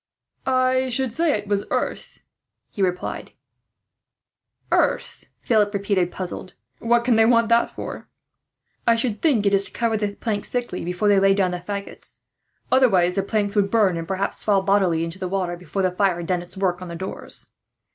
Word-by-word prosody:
"I 255 Hz, 0 st, +2 dB
should 255 Hz, -1 st, -1 dB
say 325 Hz, +4 st, +2 dB
it 205 Hz, 0 st, -8 dB
was 200 Hz, 0 st, 0 dB
earth," -, -, -3 dB, 0.5 s
he 205 Hz, -, -5 dB
replied 180 Hz, -1 st, -2 dB, 1.4 s
"Earth?" -, -, 0 dB, 0.2 s
Philip 215 Hz, -4 st, +2 dB
repeated, 195 Hz, -3 st, 0 dB
puzzled. 185 Hz, 0 st, -6 dB, 0.2 s
"What 235 Hz, +1 st, +2 dB
can 240 Hz, -3 st, +3 dB
they 225 Hz, -, +6 dB
want 230 Hz, -1 st, +3 dB
that 235 Hz, 0 st, +3 dB
for?" -, -, -7 dB, 0.8 s
"I 230 Hz, -, +6 dB
should 230 Hz, -2 st, -2 dB
think 260 Hz, -11 st, +2 dB
it 200 Hz, -, +3 dB
is 195 Hz, 0 st, +4 dB
to -, -, 0 dB
cover 230 Hz, -2 st, 0 dB
the 205 Hz, -1 st, -2 dB
planks 210 Hz, -3 st, -3 dB
thickly, 245 Hz, -7 st, -3 dB
before 180 Hz, +4 st, -1 dB
they 200 Hz, -1 st, +5 dB
lay 195 Hz, 0 st, +4 dB
down 190 Hz, -2 st, +1 dB
the 180 Hz, -, -3 dB
faggots; 200 Hz, +3 st, -7 dB, 0.5 s
otherwise 195 Hz, -9 st, +4 dB
the 195 Hz, -, 0 dB
planks 205 Hz, +1 st, -1 dB
would 200 Hz, -1 st, +2 dB
burn, 205 Hz, -5 st, +3 dB
and 165 Hz, 0 st, -5 dB
perhaps 195 Hz, +1 st, -2 dB
fall 200 Hz, -2 st, +2 dB
bodily 190 Hz, -4 st, +2 dB
in 165 Hz, -, -3 dB
the 185 Hz, +1 st, -5 dB
water, 180 Hz, -2 st, -2 dB
before 180 Hz, +3 st, -4 dB
the 185 Hz, -, +2 dB
fire 185 Hz, -1 st, +1 dB
had 170 Hz, -, -5 dB
done 180 Hz, 0 st, 0 dB
its 175 Hz, +2 st, -11 dB
work 185 Hz, -2 st, 0 dB
on 180 Hz, -, -6 dB
the 170 Hz, -, -7 dB
doors." 190 Hz, +3 st, -6 dB
200 Hz, 185 wpm, -23 LUFS, 185-225 Hz, 1.4 s, they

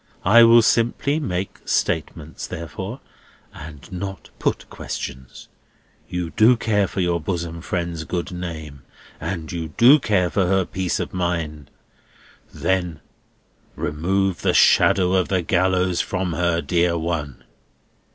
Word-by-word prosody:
I 110 Hz, +5 st, +7 dB
will 115 Hz, 0 st, +7 dB
simply 120 Hz, +7 st, +1 dB
make 95 Hz, -, -4 dB
statements, 80 Hz, -1 st, -2 dB
therefore, 95 Hz, -, -6 dB, 0.5 s
and 75 Hz, -3 st, -11 dB
not 95 Hz, +1 st, -6 dB
put -, -, -1 dB
questions. 65 Hz, 0 st, -7 dB, 0.6 s
You 90 Hz, -2 st, -3 dB
do 115 Hz, +5 st, +5 dB
care 105 Hz, -4 st, +1 dB
for 95 Hz, -, -3 dB
your 85 Hz, -1 st, +1 dB
bosom 85 Hz, 0 st, -4 dB
friend's 85 Hz, -3 st, -3 dB
good 90 Hz, +1 st, -3 dB
name, 80 Hz, -6 st, -7 dB, 0.4 s
and 85 Hz, 0 st, -5 dB
you 85 Hz, -2 st, -4 dB
do 135 Hz, +6 st, +7 dB
care 90 Hz, -8 st, +1 dB
for 95 Hz, -3 st, +1 dB
her 95 Hz, 0 st, +2 dB
peace 90 Hz, -3 st, -2 dB
of -, -, -4 dB
mind. 85 Hz, -5 st, -3 dB, 0.8 s
Then 90 Hz, -4 st, -1 dB, 0.8 s
remove 90 Hz, +5 st, -1 dB
the -, -, +1 dB
shadow 90 Hz, -1 st, +4 dB
of 95 Hz, -2 st, +2 dB
the 95 Hz, -2 st, 0 dB
gallows 90 Hz, 0 st, +1 dB
from 90 Hz, -2 st, -2 dB
her, 85 Hz, 0 st, 0 dB
dear 85 Hz, -1 st, +1 dB
one!" 80 Hz, -5 st, -4 dB
90 Hz, 130 wpm, -22 LUFS, 85-95 Hz, 0.8 s, I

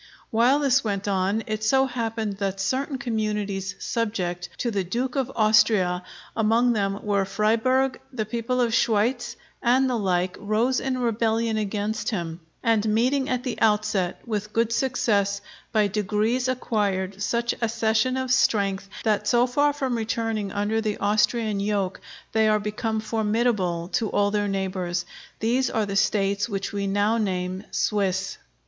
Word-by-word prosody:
While 240 Hz, +5 st, +4 dB
this 275 Hz, -2 st, +3 dB
went 200 Hz, -2 st, -2 dB
on, 195 Hz, +3 st, +1 dB
it 215 Hz, -2 st, -3 dB
so 265 Hz, +4 st, +4 dB
happened 225 Hz, -5 st, -3 dB
that 195 Hz, -1 st, -2 dB
certain 265 Hz, +7 st, -1 dB
communities 210 Hz, -5 st, -2 dB
subject 180 Hz, -6 st, -2 dB
to 240 Hz, -, -1 dB
the 200 Hz, -3 st, 0 dB
Duke 245 Hz, +8 st, -2 dB
of 265 Hz, -2 st, -1 dB
Austria, 215 Hz, -5 st, +3 dB, 0.3 s
among 230 Hz, +2 st, +3 dB
which 200 Hz, -2 st, -1 dB
were 200 Hz, -2 st, +1 dB
Friburg, 230 Hz, +6 st, +1 dB
the 225 Hz, -5 st, -2 dB
people 235 Hz, +3 st, -2 dB
of 235 Hz, -2 st, +1 dB
Schweitz, 235 Hz, +2 st, +1 dB, 0.3 s
and 255 Hz, +3 st, +3 dB
the 255 Hz, -, 0 dB
like, 185 Hz, -2 st, 0 dB
rose 225 Hz, +5 st, +1 dB
in 265 Hz, -1 st, -2 dB
rebellion 230 Hz, -1 st, 0 dB
against 210 Hz, +1 st, -2 dB
him, 170 Hz, -6 st, -3 dB, 0.2 s
and 220 Hz, -2 st, +2 dB
meeting 260 Hz, +6 st, +2 dB
at 250 Hz, -1 st, -1 dB
the 250 Hz, -3 st, -4 dB
outset 210 Hz, -4 st, +1 dB
with 210 Hz, -2 st, -3 dB
good 230 Hz, 0 st, +1 dB
success, 205 Hz, -6 st, +1 dB, 0.3 s
by 215 Hz, -2 st, +3 dB
degrees 210 Hz, +5 st, 0 dB
acquired 200 Hz, -6 st, -1 dB
such 235 Hz, +3 st, 0 dB
accession 230 Hz, +2 st, +1 dB
of 260 Hz, -1 st, -2 dB
strength 200 Hz, -5 st, +2 dB
that 215 Hz, -2 st, +1 dB
so 240 Hz, 0 st, +4 dB
far 285 Hz, +4 st, +2 dB
from 265 Hz, -4 st, -2 dB
returning 225 Hz, -2 st, -2 dB
under 210 Hz, +2 st, 0 dB
the 215 Hz, -2 st, -2 dB
Austrian 210 Hz, +1 st, +1 dB
yoke, 200 Hz, -2 st, -1 dB, 0.3 s
they 220 Hz, 0 st, +3 dB
are 215 Hz, 0 st, +3 dB
become 215 Hz, +1 st, -2 dB
formidable 215 Hz, -6 st, 0 dB
to 220 Hz, +1 st, 0 dB
all 205 Hz, 0 st, +2 dB
their 205 Hz, 0 st, 0 dB
neighbours 185 Hz, -3 st, -2 dB, 0.4 s
These 240 Hz, +3 st, +2 dB
are 220 Hz, -1 st, 0 dB
the 200 Hz, -1 st, -4 dB
States 200 Hz, +1 st, +1 dB
which 195 Hz, -2 st, -3 dB
we 200 Hz, -1 st, -1 dB
now 205 Hz, +3 st, +2 dB
name 185 Hz, -1 st, -2 dB
Swiss. 195 Hz, -2 st, -1 dB
215 Hz, 155 wpm, -25 LUFS, 200-235 Hz, 0.4 s, While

